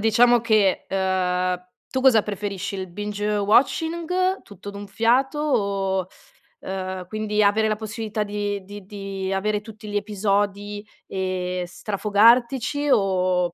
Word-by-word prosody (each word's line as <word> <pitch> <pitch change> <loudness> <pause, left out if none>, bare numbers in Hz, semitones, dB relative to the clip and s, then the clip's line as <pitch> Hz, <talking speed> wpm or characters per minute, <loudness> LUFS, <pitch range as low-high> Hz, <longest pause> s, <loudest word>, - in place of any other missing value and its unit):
diciamo 235 +2 +5
che, 215 -5 +2
uhm, 185 -1 0 0.2
tu 260 - -2
cosa 255 -5 +6
preferisci? 200 -2 -4
Il 190 -1 -4
binge 210 +2 -2
watching, 330 - +2
tutto 205 -1 -10
d'un 200 0 -8
fiato 250 +7 +2
o 195 -9 0 0.5
uhm, 185 -1 -5
quindi 215 0 0
avere 215 +2 +3
la 215 - +1
possibilità 215 0 -3
di 205 -1 -3
di 205 0 -10
di 195 -1 -4
avere 210 +2 0
tutti 215 0 -11
gli 205 - -1
episodi 205 0 -1 0.2
e 185 -1 -2
strafogartici, 235 +9 +2
o 185 -3 +2
205 Hz, 125 wpm, -23 LUFS, 190-220 Hz, 0.5 s, cosa